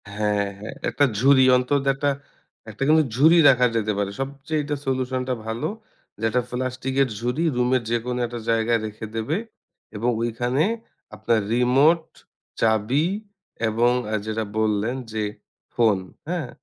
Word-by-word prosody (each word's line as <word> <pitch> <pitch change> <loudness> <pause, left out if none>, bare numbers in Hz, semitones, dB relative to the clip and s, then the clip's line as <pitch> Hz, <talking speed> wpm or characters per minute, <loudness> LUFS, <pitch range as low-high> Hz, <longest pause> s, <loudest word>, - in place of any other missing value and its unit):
হ্যাঁ, 105 -1 +1
হ্যাঁ। 105 +2 -7
১ - - -2
টা 145 - +7
ঝুড়ি 135 +1 +6
অন্তত 130 +3 +1
একটা, 145 +1 0 0.6
একটা 105 - -12
কিন্তু 155 +1 +5
ঝুড়ি 160 +6 +6
রাখা 125 -2 +4
যেতে 110 -1 +1
পারে। 100 -1 -1
সবচাইতে 140 +2 -3
সলিউশন 130 -1 -1
টা - - +2
ভালো। 110 +1 -2 0.5
যে - - -8
একটা 125 +3 +1
প্লাস্টিকের 130 +2 -1
ঝুড়ি 125 +7 -1
রুমের 125 +1 +2
যেকোনো 120 +1 -1
একটা 120 0 -6
জায়গায় 115 0 +2
রেখে 110 +1 -7
দেবে 115 +9 -1 0.6
এবং 115 +4 0
ঐখানে 120 +4 0 0.5
আপনার 115 -1 +1
রিমোট, 135 +7 +4 0.6
চাবি 115 +8 +2 0.6
এবং 115 +3 +3 0.2
আ - - -2
যেটা 110 0 -2
বললেন 110 +2 +1 0.2
যে 110 -1 -1 0.5
ফোন 110 -4 +4 0.3
হ্যাঁ? 170 -7 -2
125 Hz, 140 wpm, -23 LUFS, 110-135 Hz, 0.6 s, টা